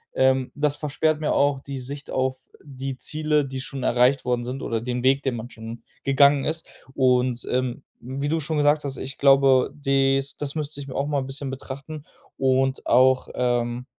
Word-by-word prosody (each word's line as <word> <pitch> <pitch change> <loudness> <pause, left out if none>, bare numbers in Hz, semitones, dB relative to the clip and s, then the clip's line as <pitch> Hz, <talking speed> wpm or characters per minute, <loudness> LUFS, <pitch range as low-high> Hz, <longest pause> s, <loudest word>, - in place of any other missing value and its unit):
ähm, 130 -1 +2
das 145 0 +1
versperrt 155 +1 0
mir 150 - 0
auch 140 -1 +2
die 140 0 -7
Sicht 140 +3 -6
auf 130 0 -1 0.2
die 135 -2 -6
Ziele, 150 -1 +1
die 130 -1 -5
schon 130 -1 -6
erreicht 125 +2 +3
worden 125 -1 0
sind, 130 +3 -5
oder 115 -1 -2
den 125 0 -3
Weg, 135 +2 +3
den 130 -3 -1
man 120 +2 -7
schon 115 +1 -9 0.2
gegangen 140 0 +4
ist, 160 +1 -3 0.3
und, 125 -2 +2
ähm, 130 +1 -1 0.2
wie 135 +3 -4
du 160 +2 0
schon 155 0 -2
gesagt 145 +1 +3
hast, 135 -3 -3
ich 135 +1 -7
glaube, 135 -2 +5
des 135 -1 +1
das 145 0 -2
müsste 150 -1 -3
ich 140 - -9
mir 130 - -8
auch 140 - 0
mal 145 -2 0
bisschen 135 +1 -3
betrachten 140 +3 -8 0.3
und 135 0 +1
auch, 130 0 +4
ähm, 120 0 -1
135 Hz, 190 wpm, -24 LUFS, 130-145 Hz, 0.3 s, glaube